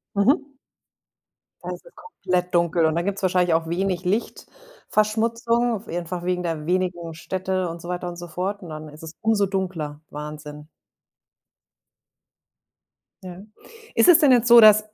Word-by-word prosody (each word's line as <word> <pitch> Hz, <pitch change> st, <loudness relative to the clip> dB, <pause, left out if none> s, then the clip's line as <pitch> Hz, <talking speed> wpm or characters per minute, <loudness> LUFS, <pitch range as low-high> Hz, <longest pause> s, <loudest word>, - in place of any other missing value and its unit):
Mhm. 270 Hz, +8 st, +2 dB, 1.2 s
Da -, -, -5 dB
ist -, -, -9 dB
es -, -, -18 dB
komplett 180 Hz, -, -3 dB
dunkel 170 Hz, -1 st, +2 dB
und 160 Hz, 0 st, +1 dB
dann 170 Hz, +1 st, -1 dB
gibt's 200 Hz, 0 st, -3 dB
wahrscheinlich 180 Hz, -2 st, +2 dB
auch 165 Hz, 0 st, -1 dB
wenig 180 Hz, +1 st, -1 dB
Lichtverschmutzung, 230 Hz, -, -1 dB
einfach 175 Hz, +1 st, -5 dB
wegen 180 Hz, 0 st, -1 dB
der 165 Hz, -3 st, -3 dB
wenigen 175 Hz, -2 st, -1 dB
Städte 185 Hz, +1 st, -3 dB
und 165 Hz, 0 st, -8 dB
so 175 Hz, -, -9 dB
weiter 180 Hz, 0 st, -3 dB
und 175 Hz, -, -9 dB
so 175 Hz, 0 st, -8 dB
fort 185 Hz, +5 st, -4 dB
und 175 Hz, -, -10 dB
dann 155 Hz, 0 st, -8 dB
ist 150 Hz, +2 st, -14 dB
es 160 Hz, 0 st, -8 dB
umso 220 Hz, -2 st, +2 dB
dunkler, 180 Hz, -6 st, -4 dB
Wahnsinn. 150 Hz, 0 st, -8 dB, 2.6 s
Ja. 180 Hz, 0 st, -9 dB, 0.5 s
Ist -, -, +4 dB
es 345 Hz, -2 st, +8 dB
denn 295 Hz, -5 st, +5 dB
jetzt 245 Hz, -1 st, +4 dB
so, 240 Hz, 0 st, +9 dB
dass 215 Hz, -1 st, +7 dB
180 Hz, 155 wpm, -23 LUFS, 170-215 Hz, 2.6 s, so